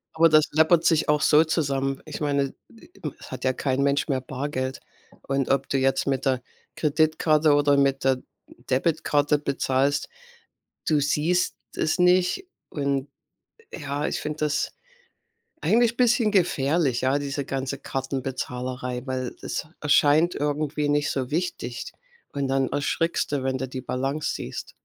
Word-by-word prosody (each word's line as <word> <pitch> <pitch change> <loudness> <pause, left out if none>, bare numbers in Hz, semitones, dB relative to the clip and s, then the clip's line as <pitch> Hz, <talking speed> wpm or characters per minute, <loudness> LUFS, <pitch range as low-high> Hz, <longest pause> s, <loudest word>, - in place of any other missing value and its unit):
Aber 165 +1 +5
das 155 0 +5
läppert 160 +2 +4
sich 160 -3 +3
auch 150 0 +3
so 155 0 +6
zusammen. 135 -4 -1
Ich 155 0 -7
meine, 140 -2 0 0.2
e - - -18 0.3
es - - -12
hat - - -6
ja 130 - +2
kein 135 +1 -1
Mensch 140 0 +1
mehr 130 -2 0
Bargeld. 130 0 -4 0.4
Und 135 -1 -1
ob 135 0 +1
du 135 - +1
jetzt 135 0 +1
mit 135 0 0
der 130 -2 +1 0.3
Kreditkarte 155 0 +3
oder 145 -1 +3
mit 135 -1 +2
der 130 -1 +2 0.5
Debitkarte 145 +1 +2
bezahlst, 140 0 0 0.8
du 155 -2 +3
siehst 155 +5 +1 0.2
es 160 +3 0
nicht. 180 - +3 0.2
Und 140 -1 -2 0.6
ja, 145 -1 -3
ich - - -2
finde 150 0 -4
das 150 0 0 0.9
eigentlich 235 +1 +3
bisschen 240 -3 +3
gefährlich, 150 - +2
ja, 130 +2 +2
diese 140 0 -3
ganze 135 0 -3
Kartenbezahlerei, 130 -2 -4
weil 130 -1 -3
es - - -3
erscheint 150 +3 +4
irgendwie 150 0 -1
nicht 145 0 +1
so 130 -1 -2
wichtig. 155 -7 -3 0.4
Und 140 -1 -1
dann 135 0 +1
erschrickst 155 +2 -1
du, 140 -2 0
wenn 130 0 -1
du 130 - -3
die 130 0 -5
Balance 135 +4 -2
siehst. - - -6
145 Hz, 145 wpm, -25 LUFS, 135-155 Hz, 0.9 s, so